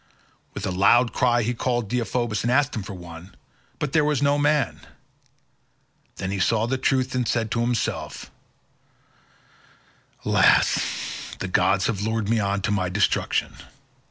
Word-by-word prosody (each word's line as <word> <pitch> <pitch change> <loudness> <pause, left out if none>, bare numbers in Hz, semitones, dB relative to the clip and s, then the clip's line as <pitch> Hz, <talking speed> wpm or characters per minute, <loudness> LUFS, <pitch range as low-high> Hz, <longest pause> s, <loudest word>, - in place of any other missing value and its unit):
With - - -4
a - - -1
loud 115 +6 +4
cry 120 -2 +2
he 120 +3 -1
called 120 -2 -1
Deiphobus 120 -2 -1
and 120 - 0
asked 140 +2 +2
him 110 - -2
for 100 0 -8
one, 85 +1 -11 0.4
but 145 -3 -3
there 155 -2 +4
was 150 -2 +1
no 145 +1 +2
man; 145 -2 +1 1.4
then 95 - -4
he 100 - -2
saw 110 +3 +2
the 130 +2 -2
truth 130 0 +1
and 125 -2 -1
said 115 -1 -1
to 115 - 0
himself, 120 -1 -3 1.9
"Alas! - - +1
the 95 - -4
gods 95 +1 +2
have 100 -4 -1
lured 110 -1 -1
me 115 0 +2
on 100 -1 -1
to 95 - 0
my 95 -3 0
destruction. 100 +2 0
115 Hz, 155 wpm, -24 LUFS, 100-125 Hz, 1.9 s, loud